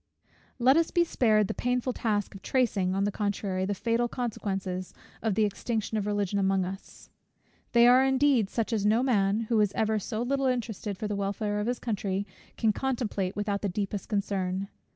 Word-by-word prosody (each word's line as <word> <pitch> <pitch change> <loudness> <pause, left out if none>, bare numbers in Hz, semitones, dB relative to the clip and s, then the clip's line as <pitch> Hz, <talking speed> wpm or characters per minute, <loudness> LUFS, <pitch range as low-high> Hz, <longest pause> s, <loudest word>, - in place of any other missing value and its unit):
Let 260 +4 +5
us 330 0 +2
be 345 - +3
spared 215 - +2
the - - -2
painful 250 +1 -1
task 210 -4 -1
of 195 - -10
tracing, 200 -8 +1
on 195 - +1
the 205 - +1
contrary, 200 -2 -2
the 205 +1 -1
fatal 235 +4 0
consequences 195 -6 -4 0.3
of 220 -4 0
the 220 - +3
extinction 220 +2 -2
of 210 -1 -1
Religion 205 -1 0
among 190 -1 +2
us. 190 +2 -9 0.6
They 235 -1 +7
are 250 +2 +7
indeed 265 -5 +3
such 230 +1 -2
as 215 -3 0
no 220 +4 +3
man, 210 -4 +2
who 225 -1 +1
is 205 -2 +2
ever 220 0 +1
so 215 +3 -3
little 270 +2 0
interested 220 -5 -2
for 210 - -3
the 210 - -2
welfare 205 +1 -2
of 210 - -2
his 245 0 0
country, 200 -4 -2 0.3
can 220 -2 +2
contemplate 220 -7 -2
without 205 -1 -1
the 205 - -1
deepest 200 +1 -3
concern. 195 -2 -1
210 Hz, 190 wpm, -28 LUFS, 195-240 Hz, 0.6 s, They